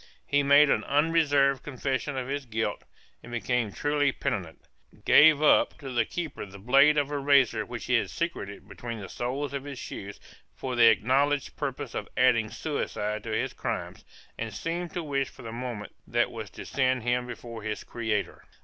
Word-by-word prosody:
He 145 - +2
made 140 +1 +6
an - - +2
unreserved 145 -3 +3
confession 135 0 -3
of 125 -1 -3
his 140 -1 -3
guilt, 110 -2 -2 0.4
and 120 - -12
became 120 -2 -1
truly 145 +3 +1
penitent; 90 -9 -4 0.4
gave 155 -1 +7
up 150 - +4
to 135 -3 -7
the 120 - +2
keeper 165 -5 -5
the 100 -1 -10
blade 135 +8 +5
of 145 0 +1
a 145 - -1
razor 135 -6 +3
which 120 -2 -6
he 125 - -1
had 115 - +2
secreted 135 - -4
between 115 +3 -7
the 100 - -7
soles 135 +3 -3
of 140 -1 -3
his 140 -2 -7
shoes 100 -4 -7 0.4
for 130 -1 -4
the 120 -1 +7
acknowledged 135 +6 +2
purpose - - -4
of - - -4
adding 115 -4 +4
suicide 105 -7 -3
to - - -5
his 110 - -1
crimes, - - -4 0.4
and 115 -2 -4
seemed 170 +4 -3
to 175 - -2
wish 140 -3 -1
for - - -14
the 115 - -6
moment 120 -3 -6
that - - +1
was - - -7
to - - -10
send 130 -3 +1
him 125 +1 0
before 115 -1 -8
his 105 0 -4
Creator. 110 -3 -3
130 Hz, 185 wpm, -28 LUFS, 115-145 Hz, 0.4 s, gave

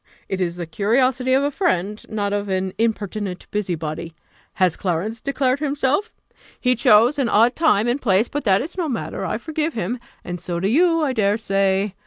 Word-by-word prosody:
It 190 -1 -3
is 175 -1 -1
the 175 -1 -5
curiosity 250 +9 +1
of 270 +1 +3
a 285 - 0
friend, 210 - -1
not 205 -2 -2
of 205 0 -2
an 190 0 -1
impertinent 210 -4 -2
busybody. 165 -5 -3 0.4
Has 185 -3 +2
Clarence 195 +5 -2
declared 275 -1 0
himself? 290 +6 0 0.5
He 250 0 +2
chose 240 +3 +4
an 255 -4 +1
odd 230 +4 +4
time 230 -9 +3
and 250 +4 0
place; 205 0 +2
but 290 - -4
that 195 +1 +3
is 345 +5 -8
no 330 -3 -1
matter; 240 - -4
I - - -1
forgive 315 0 -3
him, 225 +4 -2 0.2
and 175 -1 -6
so 175 -1 -3
do 190 - 0
you, 330 +5 +3
I 275 -3 0
dare 210 -3 +2
say. 195 -2 +1
215 Hz, 190 wpm, -21 LUFS, 190-265 Hz, 0.5 s, chose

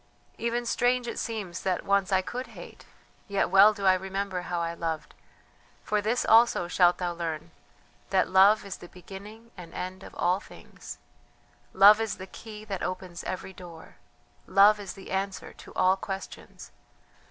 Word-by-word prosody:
Even 235 +1 -1
strange 245 +1 +1
it - - -4
seems 210 -7 -4
that 185 -2 -1
once 200 0 +1
I 190 -1 +3
could 250 +7 -5
hate; - - -12 0.4
yet 200 -3 0
well 195 +2 +8
do 200 -2 -5
I 190 - +7
remember 190 0 -3
how 175 -1 -3
I 170 0 -2
loved; 165 -2 -4 0.7
for 210 -1 0
this 225 +4 0
also 225 -5 +5
shalt 175 0 +3
thou 175 -1 -2
learn: 165 -1 -5 0.6
that 190 -1 +2
Love 195 +3 +5
is 195 - -6
the 175 - -12
beginning 200 +6 -12
and 175 -3 -11
end 185 +1 -5
of - - -12
all 180 +2 +1
things. - - -12 0.7
"Love 205 +3 +7
is 225 -2 -2
the 190 - -8
key 215 +2 -11
that 195 -3 -5
opens 185 -1 -5
every 185 +1 -5
door. 175 -3 -13 0.5
Love 205 +2 +6
is 195 -3 -7
the 195 - -12
answer 195 0 -3
to - - -14
all 185 +1 +4
questions. 195 0 -8
190 Hz, 165 wpm, -27 LUFS, 180-210 Hz, 0.7 s, well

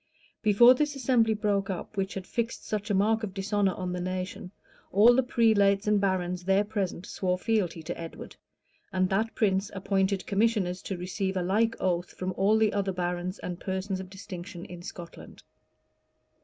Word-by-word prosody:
[] - - -36
Before 240 +5 +8
this 295 +2 -1
assembly 235 -4 +2
broke 205 -2 0
up, 190 +3 -5
which 195 0 -2
had 190 -2 -5
fixed 230 +4 -3
such 210 0 -3
a 205 - +2
mark 220 +3 +2
of 205 -4 -5
dishonor 195 -1 0
on 180 -1 -3
the 180 - -3
nation, 185 0 -4 0.4
all 215 +5 +7
the 260 - +4
prelates 210 -5 +3
and 210 -1 +3
barons 180 -2 -1
there 195 +2 +3
present 200 -4 -3
swore 180 -1 -1
fealty 185 -6 -1
to 175 +2 -4
Edward; 165 -1 -8 0.6
and 185 -1 +1
that 220 +4 0
prince 195 -2 +1
appointed 195 0 0
commissioners 200 -3 +1
to 190 - -4
receive 190 +2 -2
a 180 - 0
like 220 +5 +2
oath 175 -1 -1
from 185 0 -3
all 205 +3 +3
the 220 -1 +2
other 200 -1 0
barons 180 +1 -3
and 175 0 -6
persons 190 0 -3
of 190 -1 -7
distinction 185 -2 -8
in 175 -1 -9
Scotland. 175 -1 -10
195 Hz, 180 wpm, -28 LUFS, 185-210 Hz, 0.6 s, Before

